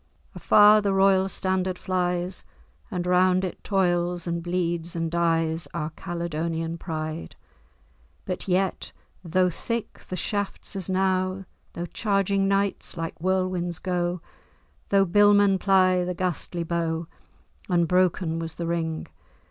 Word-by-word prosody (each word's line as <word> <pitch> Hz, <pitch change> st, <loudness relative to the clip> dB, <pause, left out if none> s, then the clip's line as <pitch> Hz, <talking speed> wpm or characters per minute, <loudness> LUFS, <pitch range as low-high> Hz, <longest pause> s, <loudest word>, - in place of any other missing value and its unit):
"Afar, 210 Hz, +1 st, +6 dB
the 200 Hz, -1 st, 0 dB
royal 195 Hz, 0 st, +4 dB
standard 185 Hz, -1 st, -1 dB
flies, 180 Hz, -1 st, -1 dB, 0.5 s
And 180 Hz, -1 st, -3 dB
round 185 Hz, +1 st, +3 dB
it 180 Hz, -, -7 dB
toils 175 Hz, -3 st, +1 dB
and 170 Hz, -1 st, -2 dB
bleeds 175 Hz, -1 st, -2 dB
and 165 Hz, -1 st, -2 dB
dies. 165 Hz, -1 st, +1 dB
Our 155 Hz, -1 st, -2 dB
Caledonian 165 Hz, -1 st, -3 dB
pride!" 155 Hz, -1 st, -5 dB, 0.9 s
But 185 Hz, -, -4 dB
yet, 190 Hz, 0 st, 0 dB, 0.3 s
though 180 Hz, +1 st, +2 dB
thick 230 Hz, +7 st, -4 dB
the 185 Hz, -, -3 dB
shafts 200 Hz, +2 st, -3 dB
as 190 Hz, -2 st, -3 dB
now, 185 Hz, 0 st, 0 dB, 0.3 s
Though 170 Hz, -, -4 dB
charging 195 Hz, 0 st, 0 dB
knights 195 Hz, -2 st, -1 dB
like 165 Hz, 0 st, -5 dB
whirlwinds 185 Hz, -2 st, 0 dB
go, 175 Hz, -1 st, -2 dB, 0.7 s
Though 195 Hz, -1 st, +4 dB
billmen 205 Hz, +1 st, +5 dB
ply 185 Hz, -2 st, +4 dB
the 180 Hz, 0 st, -3 dB
ghastly 175 Hz, -1 st, -2 dB
bow, 165 Hz, -1 st, -2 dB, 0.6 s
Unbroken 175 Hz, -1 st, +2 dB
was 165 Hz, -1 st, -5 dB
the 170 Hz, -, -4 dB
ring. 165 Hz, -1 st, -2 dB
180 Hz, 125 wpm, -25 LUFS, 170-190 Hz, 0.9 s, Afar